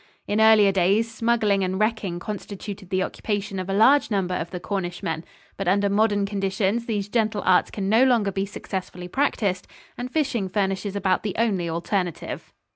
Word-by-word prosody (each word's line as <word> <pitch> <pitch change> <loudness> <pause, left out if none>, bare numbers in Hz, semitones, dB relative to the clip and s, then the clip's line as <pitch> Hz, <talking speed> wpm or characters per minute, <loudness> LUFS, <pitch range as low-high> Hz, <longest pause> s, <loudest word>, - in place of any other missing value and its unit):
In 210 +2 +1
earlier 220 -2 +6
days, 200 +5 +2
smuggling 220 -4 +1
and 185 +1 -1
wrecking 215 -5 0
constituted 200 0 -7
the 185 -1 +1
occupation 205 -2 -3
of 185 +1 -5
a - - 0
large 265 +7 +5
number 190 -4 0
of 170 -1 -3
the 180 - -5
Cornishmen, 175 -3 -3 0.3
but 195 - -3
under 200 +2 +3
modern 205 -1 +2
conditions 200 +3 -1
these 205 -3 -1
gentle 215 -2 0
arts 185 -1 +4
can 195 -2 -4
no 225 +5 +5
longer 235 -6 +3
be 195 +1 -2
successfully 185 -3 -6
practiced, 200 -5 0 0.3
and 250 +1 -4
fishing 260 -10 0
furnishes 195 0 -1
about 190 -2 +1
the 205 -3 -4
only 200 -7 +1
alternative. 175 +1 -3
200 Hz, 170 wpm, -24 LUFS, 190-220 Hz, 0.3 s, earlier